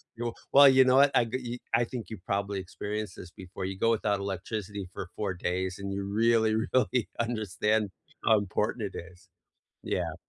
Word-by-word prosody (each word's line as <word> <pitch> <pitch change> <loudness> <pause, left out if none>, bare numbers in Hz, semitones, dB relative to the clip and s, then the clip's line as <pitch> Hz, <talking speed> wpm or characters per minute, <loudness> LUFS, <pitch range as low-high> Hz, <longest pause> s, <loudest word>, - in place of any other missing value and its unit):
You 120 0 -3 0.2
well, 140 0 +9
you 130 0 +7
know 130 0 +5
what? 140 +1 +7
I 120 - +5
ge 115 +3 -5
ye 125 -1 -4
I 115 +1 +4
think 120 -1 -7
you 110 - -6
probably 100 0 -1
experienced 105 +1 -5
this 90 - -10
before. 95 0 -7
You 95 0 -4
go 115 - +3
without 105 -2 +1
electricity 100 +1 -4
for 90 - -6
4 100 -3 -2
days, 90 +1 -2
and 100 0 -4
you 100 0 -3
really, 110 +2 +3 0.2
really 130 -2 +2
understand 110 -2 0 0.4
how 110 - +6
important 105 +3 -2
it - - -3
is. 95 +3 -23 0.6
Yeah. - - -2
105 Hz, 185 wpm, -29 LUFS, 95-115 Hz, 0.6 s, well